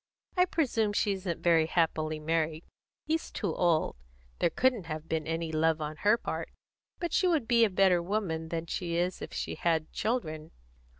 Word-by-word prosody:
I 360 -1 +5
presume 235 - 0
she 205 - +2
isn't 185 -3 -3
very 165 -2 +4
happily 155 -2 0
married; 160 +1 -1 0.4
he's 320 +1 -1
too 195 -7 -3
old; 170 - +2 0.4
there - - +3
couldn't 245 -2 +1
have 155 0 -5
been 160 -1 -2
any 165 0 -2
love 160 0 +2
on 155 0 -4
her 210 +6 +4
part. - - -4 0.5
But 345 -2 -3
she 370 - +3
would 320 -9 +1
be 235 -1 +5
a - - 0
better 185 -2 +4
woman 170 -4 -2
than 165 0 -3
she 170 0 -3
is 175 +1 -1
if - - -6
she - - -3
had 160 -2 0
children. 160 -9 -2
170 Hz, 180 wpm, -30 LUFS, 160-210 Hz, 0.5 s, I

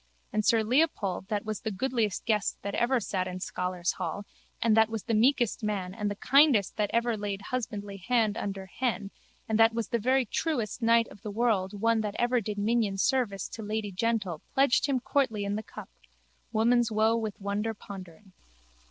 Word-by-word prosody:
And 215 - +1
sir 225 +1 +3
Leopold 220 - +1
that 210 -1 -2
was 215 -2 -4
the 220 - -2
goodliest 225 0 -1
guest 215 -3 +1
that 200 - -3
ever 245 +2 +2
sat 190 -3 -2
in 185 0 -5
scholars' 180 -1 -2
hall 205 - -4 0.4
and 225 -2 +3
that 220 0 +5
was 225 -2 -4
the 230 - -2
meekest 240 0 +2
man 195 -4 -2
and 210 0 -2
the 205 - -3
kindest 265 -4 +4
that 210 -1 +1
ever 235 0 +1
laid 205 -1 -4
husbandly 205 -5 -4
hand 220 +1 +1
under 195 -2 -4
hen 210 -1 -2 0.4
and 220 0 0
that 225 0 +5
was 230 -3 -2
the 235 - 0
very 260 +3 +2
truest 245 -2 -2
knight 230 0 +4
of 200 - -14
the 210 - -6
world 205 -3 0
one 225 +1 +2
that 210 -1 -3
ever 240 0 +2
did 210 0 -4
minion 210 -1 +1
service 210 -4 +1
to 225 - -7
lady 210 -1 -3
gentle 195 -5 -1
pledged 270 0 +4
him 270 -2 +1
courtly 250 -5 0
in 200 +1 -1
the 215 - -2
cup. - - -11 0.6
Woman's 235 +1 +3
woe 220 +1 +3
with 220 -3 -3
wonder 205 +3 -2
pondering. 190 -1 -11
215 Hz, 190 wpm, -28 LUFS, 200-235 Hz, 0.6 s, that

